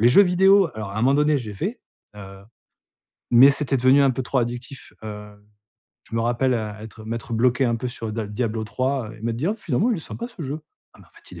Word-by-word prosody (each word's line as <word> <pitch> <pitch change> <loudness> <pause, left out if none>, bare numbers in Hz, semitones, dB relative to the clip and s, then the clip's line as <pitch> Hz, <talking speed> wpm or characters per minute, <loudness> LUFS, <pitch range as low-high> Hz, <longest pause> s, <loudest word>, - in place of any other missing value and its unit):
Les 120 - +6
jeux 200 +11 +7
vidéo, 190 0 +4
alors 110 -3 -6
à - - -9
un 110 - -2
moment 135 +2 +4
donné, 150 +1 +3
j'ai 110 -5 -7
fait. 205 - -4 0.4
Heu, 95 -1 -11 0.9
mais 130 +4 +8
c'était 140 -1 0
devenu 130 +3 +5
un 135 - +4
peu 130 - -3
trop 135 - -2
addictif. 120 +3 -5
Heu, 105 -1 -8 0.7
je - - -10
me - - +1
rappelle 120 +2 +1
être 110 0 -6
m'être 115 +1 -5
bloqué 125 +3 +2
un 120 -2 +1
peu 125 +2 -4
sur 115 -3 -6
da 110 -1 -3
Diablo 110 0 -2
III 130 -1 -2
et - - -17
m'être 115 0 -1
dit: 155 +9 -1
«Oh, 215 - 0
finalement, 195 - 0
il 220 - +1
est - - -7
sympa 235 +9 -7
ce 215 -9 -10
jeu. 145 +3 -4 0.3
Ah, - - -19
mais - - -18
en - - -27
fait, - - -17
il - - -10
est - - -10
120 Hz, 245 wpm, -23 LUFS, 110-140 Hz, 0.9 s, mais